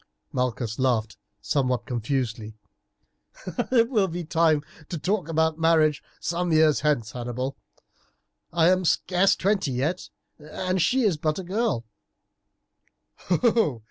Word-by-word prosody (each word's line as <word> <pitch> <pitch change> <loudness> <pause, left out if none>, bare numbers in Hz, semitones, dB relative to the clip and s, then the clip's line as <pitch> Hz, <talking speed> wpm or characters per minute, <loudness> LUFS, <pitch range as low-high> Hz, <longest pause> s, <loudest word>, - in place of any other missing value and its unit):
Malchus 125 -3 -2
laughed 115 -4 0 0.3
somewhat 130 -4 0
confusedly. 115 -3 -3 1.1
"It 230 -3 +4
will 210 -6 +3
be 175 0 -4
time 160 -2 +2 0.3
to 170 - -3
talk 185 +2 -1
about 160 0 +1
marriage 160 -2 +3 0.2
some 175 +1 -2
years 155 -1 +4
hence, 130 -8 0
Hannibal; 125 +3 -4 1.0
I 170 +1 +4
am 185 0 +2
scarce 180 +2 +2
twenty 195 -5 0
yet, 150 +9 -2 0.3
and 185 +5 -2
she 260 +8 +2
is 195 -8 +2
but 155 0 -1
a 190 - -4
girl." 195 - -1
155 Hz, 115 wpm, -25 LUFS, 130-180 Hz, 1.1 s, It